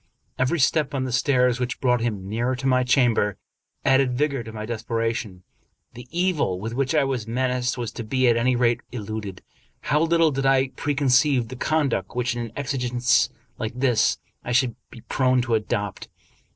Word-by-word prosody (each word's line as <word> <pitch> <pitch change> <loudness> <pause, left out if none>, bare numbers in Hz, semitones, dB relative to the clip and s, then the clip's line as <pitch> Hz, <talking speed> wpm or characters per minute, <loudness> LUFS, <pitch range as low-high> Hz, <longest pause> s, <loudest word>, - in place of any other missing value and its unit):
Every 130 +7 +1
step 145 +1 +2
on 130 - 0
the 130 - -3
stairs 125 -1 +2
which 125 0 -3
brought 125 -2 +2
him 105 -5 -3
nearer 120 +5 -1
to 130 +2 -7
my 130 -1 +3
chamber 120 -6 +2 0.5
added 130 -2 +3
vigor 140 -2 0
to 115 - -9
my 110 -1 -6
desperation. 115 -4 -3 0.5
The 125 +1 -11
evil 170 - 0
with 110 +4 -5
which 135 +4 0
I 150 - +4
was 130 -5 -2
menaced 125 +1 -1
was 120 -2 -3
to 115 - -6
be 130 +3 +1
at 120 - +4
any 125 +2 +2
rate 120 -1 +2
eluded. 105 -4 -6 0.4
How 150 - +1
little 165 -1 +3
did 135 0 0
I 135 0 +3
preconceive 135 -3 +2
the 130 - -7
conduct 135 - -1
which, 125 -1 0
in 120 - -3
an 115 - -7
exigence 125 -3 +1 0.3
like 110 0 -3
this, 125 -4 +2 0.3
I 120 - -3
should 125 -1 +2
be 115 - -12
prone 130 +1 +1
to 120 -2 -2
adopt! 105 -2 -2
125 Hz, 180 wpm, -24 LUFS, 115-135 Hz, 0.5 s, I